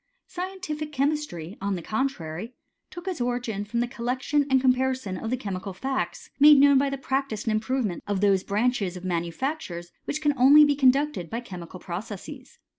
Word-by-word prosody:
Scientific 355 -5 -5
chemistry, 275 - -2
on 200 0 -1
the 175 - -6
contrary, 220 -3 -3 0.3
took 350 +2 -10
its 360 -8 -3
origin 240 -4 -2
from 235 +3 -2
the 240 - 0
col 240 -1 -7
lection 275 +3 +1
and 265 0 +4
comparison 255 -5 +1
of 220 +5 -4
the 255 - 0
chemical 195 -4 -5
facts, 265 +8 -3
made 295 +1 +9
known 280 -1 +6
by 280 0 +1
the 275 - -3
practice 270 -5 -2
and 225 - 0
improvement 220 -3 -1
of 205 -2 0
those 195 -1 +3
branches 205 -3 0
of 180 - -9
manufactures 175 - -3
which 300 - -2
can 295 -1 +2
only 290 +4 +8
be 290 -1 +2
conducted 270 - +2
by 230 - -3
chemical 180 -6 -9
processes. 210 - -7
245 Hz, 180 wpm, -26 LUFS, 195-280 Hz, 0.3 s, made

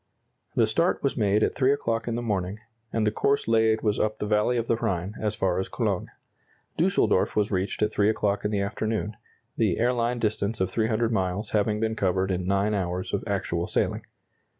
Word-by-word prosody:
The 115 - +4
start 165 +12 +1
was 140 - +1
made 105 -2 +2
at - - +1
three 130 0 +3
o'clock 115 -5 -1
in 115 - -1
the 120 - -3
morning, 100 -3 -2 0.3
and 110 -1 0
the 105 - +2
course 140 +6 +1
laid 110 -1 +3
was 105 -1 +1
up 110 0 0
the - - -3
valley 105 +3 +2
of 115 - 0
the 115 - +1
Rhine, 95 -2 -2
as 105 -1 0
far 95 -1 0
as 95 - -3
Cologne. - - -1 0.7
Düsseldorf - - +2
was 105 0 +1
reached 95 +2 -1
at 105 - +1
three 100 +1 +2
o'clock 105 -2 0
in 105 - 0
the 105 -2 0
afternoon, 105 +1 -2 0.4
the - - +2
airline 120 0 +1
distance 110 -1 -1
of 95 0 0
300 110 +2 +1
miles 95 0 -1
having 105 0 +1
been 110 0 0
covered 95 -1 0
in 90 -1 -2
9 100 +2 +1
hours 90 -2 -2
of 100 - -1
actual 90 -4 -1
sailing. - - 0
105 Hz, 200 wpm, -26 LUFS, 100-115 Hz, 0.7 s, The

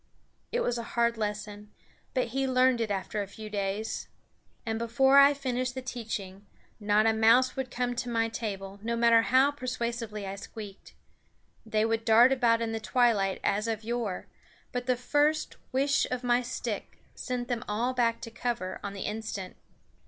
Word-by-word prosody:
It 485 - 0
was 240 - 0
a 235 +1 -8
hard 235 0 +3
lesson, 210 -1 -4 0.5
but 255 -2 +1
he 270 +3 -1
learned 255 -1 +3
it 225 - -1
after 200 +1 -2
a 200 - -4
few 215 +2 -9
days. 200 +1 -2 0.6
And 225 -1 -2
before 265 +4 +5
I 280 +1 +7
finished 255 -2 -2
the 260 - -3
teaching, 205 -6 -6 0.3
not 210 0 +3
a 225 - +4
mouse 230 +4 +4
would 265 -1 -3
come 245 0 -1
to 245 +1 -2
my 225 -1 +1
table, 200 -3 -5
no 235 +2 -2
matter 230 -1 +5
how 260 +4 +4
persuasively 235 -6 -4
I 195 +1 -5
squeaked. 205 -1 -10 0.7
They 215 0 +1
would 225 0 0
dart 230 +3 +6
about 235 -3 +3
in 225 - -2
the 225 - -2
twilight 220 -5 +2
as 205 +3 +1
of 220 -1 -2
yore, 230 -4 -3 0.5
but 245 0 -4
the 250 -1 +2
first 295 +5 +1
whish 275 +2 +2
of 250 0 -3
my 245 0 +3
stick 250 +1 -5 0.2
sent 250 -1 -4
them 240 -3 -2
all 230 +5 0
back 235 -2 +1
to 230 - -7
cover 230 -6 -3
on 200 - -4
the 195 - -7
instant. 210 -3 -5
230 Hz, 175 wpm, -29 LUFS, 210-250 Hz, 0.7 s, I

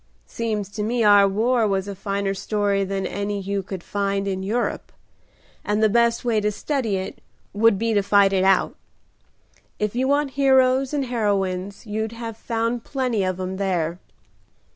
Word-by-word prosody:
"Seems 215 -3 -3
to 210 +1 -5
me 230 +2 0
our 205 -1 +6
war 225 +3 +2
was 195 -1 -1
a 200 - -4
finer 200 0 -2
story 200 0 0
than 195 0 -3
any 205 0 -3
you 200 0 -2
could 190 -2 -7
find 200 -1 -1
in 190 -1 -2
Europe, 225 +5 -2 0.7
and 210 +1 0
the 215 - +5
best 235 0 +2
way 225 -3 +2
to 210 0 +1
study 240 -2 -2
it 190 0 -5 0.3
would 215 0 +4
be 225 +2 0
to 205 - +3
fight 200 0 +4
it 190 -1 +2
out. 190 0 +3 1.0
If 210 +1 -2
you 260 +2 +1
want 285 0 +1
heroes 265 -1 +3
and 285 -2 -1
heroines 200 -5 -2
you'd 220 +1 -3
have 230 -1 -6
found 230 +1 -2
plenty 250 -7 -1
of 185 0 -2
'em 185 0 -4
there." 175 -3 -1
205 Hz, 170 wpm, -23 LUFS, 195-230 Hz, 1.0 s, our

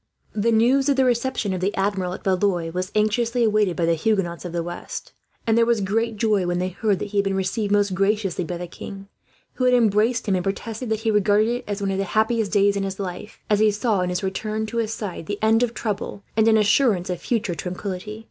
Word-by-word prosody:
'" - - -38
The 230 - +4
news 255 +5 +3
of 280 - +3
the 265 0 +3
reception 240 -4 0
of 185 - -3
the 195 +3 0
Admiral, 195 -2 -1
at - - -8
Blois, 185 -3 +1
was 185 +2 -3
anxiously 230 +3 +1
awaited 210 -5 +2
by 170 - 0
the 165 - +3
Huguenots 175 -1 -1
of 175 - -5
the 170 0 -2
west; 175 +1 -7 0.3
and 225 - +2
there 230 - +5
was 235 -2 +3
great 220 +3 -1
joy 210 -4 +1
when 175 0 0
they 180 +1 -1
heard 200 +2 0
that 205 - -5
he 205 0 0
had - - +3
been 195 -1 -1
received 195 +2 -1
most 205 -1 +2
graciously 195 -1 0
by 175 +1 -4
the 175 - -5
king, 195 +3 -9 0.4
who 255 - -1
had 250 0 +5
embraced 225 +1 +2
him, 200 - +2
and 180 -1 0
protested 225 +5 -4
that 220 0 -1
he 220 -1 +1
regarded 210 +1 +3
it 245 +1 -3
as 205 0 -3
one 195 - 0
of 190 - -1
the - - +1
happiest 220 -1 +2
days 200 -1 +3
in 200 - -1
his 195 0 -4
life; 190 +1 -6
as 210 -1 +2
he 215 0 +5
saw, 210 -1 0
in 180 - -1
his 180 +2 -2
return 215 +3 -2
to 230 +2 -5
his 225 -2 0
side, 200 -7 -5
the 205 - -3
end 225 +1 +4
of 240 -1 0
trouble 205 -2 -4
and 220 0 +3
an 220 -1 +5
assurance 205 -3 +2
of 180 - -4
future 225 -6 -1
tranquillity. 185 +4 -5
205 Hz, 250 wpm, -23 LUFS, 190-225 Hz, 0.4 s, there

